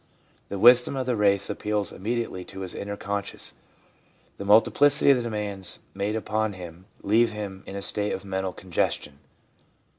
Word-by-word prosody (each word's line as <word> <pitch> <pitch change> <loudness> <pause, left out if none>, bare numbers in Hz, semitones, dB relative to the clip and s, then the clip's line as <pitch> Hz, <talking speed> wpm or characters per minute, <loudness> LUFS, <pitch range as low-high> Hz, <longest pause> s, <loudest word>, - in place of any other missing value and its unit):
The 100 - -4
wisdom 125 +5 +6
of 130 -1 -2
the 125 -1 0
race 100 -2 +2
appeals 105 -1 -2
immediately 110 -3 -3
to 95 - -9
his 95 -2 -5
inner 100 0 -5
consciousness. 100 0 -4 0.8
The 100 - -6
multiplicity 140 +8 +5
of 135 - +5
the - - -1
demands 105 -5 -3
made 100 +2 -2
upon 110 -1 -1
him 90 0 -10 0.2
leave 115 +2 +3
him 100 -3 -6
in 95 - -7
a 100 - -4
state 105 +1 -1
of 95 - -6
mental 95 -1 -2
congestion. 80 -6 -2
100 Hz, 160 wpm, -26 LUFS, 95-110 Hz, 0.8 s, wisdom